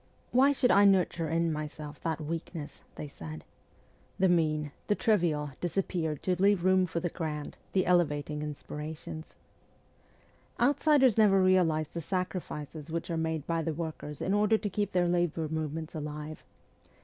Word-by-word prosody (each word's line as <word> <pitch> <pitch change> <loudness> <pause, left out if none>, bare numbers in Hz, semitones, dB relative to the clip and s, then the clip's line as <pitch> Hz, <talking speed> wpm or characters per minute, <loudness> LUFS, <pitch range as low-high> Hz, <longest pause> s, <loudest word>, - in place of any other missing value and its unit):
' - - -35
Why 265 +3 +5
should 260 -3 +3
I 200 - +6
nurture 180 -4 +3
in 165 0 +1
myself 150 0 -6
that 160 -1 -2
weakness? 160 0 -6
' - - -32
they 150 - -6
said. 80 - -9 0.7
The 190 0 +3
mean, 155 -4 +1 0.2
the 210 - +3
trivial 165 -11 +1
disappeared 175 -4 -1
to 180 -1 0
leave 200 -3 +4
room 185 -1 +4
for 170 0 -2
the 175 - -2
grand, 150 -4 -4 0.2
the 185 -1 +2
elevating 150 -4 +1
inspirations. 150 +1 -7 1.2
Outsiders 270 -2 +4
never 200 -3 +6
realize 175 -5 +3
the 170 - -5
sacrifices 165 -4 -4
which 170 +1 -3
are - - 0
made 160 -2 -2
by 165 -1 0
the 160 -1 -2
workers 155 -3 -5
in 190 - 0
order 210 +1 +4
to 210 -1 -3
keep 205 +2 -1
their 180 -1 +2
labour 175 -2 0
movements 160 0 -3
alive. 150 0 -6
165 Hz, 160 wpm, -30 LUFS, 155-185 Hz, 1.2 s, I